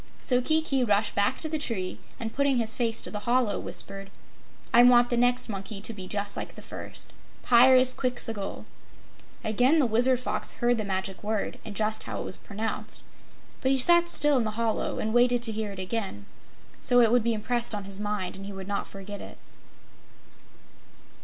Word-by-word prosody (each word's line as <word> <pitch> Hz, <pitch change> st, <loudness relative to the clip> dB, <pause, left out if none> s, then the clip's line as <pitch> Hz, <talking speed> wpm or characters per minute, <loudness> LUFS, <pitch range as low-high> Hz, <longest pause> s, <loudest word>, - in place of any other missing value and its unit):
So 250 Hz, -1 st, +1 dB
Kiki 310 Hz, -2 st, +2 dB
rushed 210 Hz, -2 st, +1 dB
back 205 Hz, +6 st, +1 dB
to 315 Hz, -, -3 dB
the 310 Hz, 0 st, -2 dB
tree 195 Hz, -10 st, -3 dB, 0.2 s
and 225 Hz, -1 st, -4 dB
putting 280 Hz, -1 st, +2 dB
his 225 Hz, -2 st, 0 dB
face 230 Hz, -2 st, 0 dB
to -, -, -3 dB
the 210 Hz, -, -4 dB
hollow, 240 Hz, -5 st, +2 dB
whispered: 195 Hz, +3 st, -6 dB, 0.6 s
"I 235 Hz, -, +8 dB
want 245 Hz, 0 st, +6 dB
the -, -, +3 dB
next 245 Hz, +1 st, +2 dB
monkey 200 Hz, -1 st, -5 dB
to 220 Hz, +3 st, -5 dB
be 190 Hz, -3 st, -8 dB
just 200 Hz, 0 st, -2 dB
like -, -, -6 dB
the -, -, -11 dB
first -, -, -7 dB, 0.3 s
Pyrzqxgl!" 250 Hz, -3 st, +3 dB, 0.8 s
Again 245 Hz, +8 st, +3 dB
the 295 Hz, -, +4 dB
Wizard 245 Hz, +3 st, +3 dB
Fox 255 Hz, -, -2 dB
heard 240 Hz, -1 st, +1 dB
the 215 Hz, -, -2 dB
Magic 190 Hz, 0 st, -3 dB
Word, 215 Hz, -1 st, -2 dB
and 215 Hz, -2 st, -8 dB
just 215 Hz, +1 st, 0 dB
how -, -, -5 dB
it -, -, -5 dB
was -, -, -3 dB
pronounced. 215 Hz, +2 st, -5 dB, 0.6 s
But 260 Hz, -, +1 dB
he 270 Hz, -, +3 dB
sat 345 Hz, +6 st, +4 dB
still 295 Hz, -4 st, +3 dB
in -, -, +1 dB
the 215 Hz, 0 st, -4 dB
hollow 230 Hz, -2 st, -1 dB
and 220 Hz, 0 st, -2 dB
waited 245 Hz, 0 st, +3 dB
to 230 Hz, -, +1 dB
hear 215 Hz, -1 st, -3 dB
it 195 Hz, -, -10 dB
again, 190 Hz, -, -4 dB, 0.6 s
so 245 Hz, -1 st, +4 dB
it 230 Hz, -2 st, +5 dB
would 245 Hz, -1 st, +3 dB
be 230 Hz, 0 st, +1 dB
impressed 235 Hz, +1 st, -1 dB
on 205 Hz, -, -5 dB
his 195 Hz, 0 st, -5 dB
mind 205 Hz, -3 st, -3 dB
and 195 Hz, +1 st, -8 dB
he -, -, -6 dB
would 195 Hz, -1 st, -8 dB
not 200 Hz, 0 st, -2 dB
forget 195 Hz, +1 st, -8 dB
it. -, -, -10 dB
225 Hz, 190 wpm, -27 LUFS, 205-245 Hz, 0.8 s, I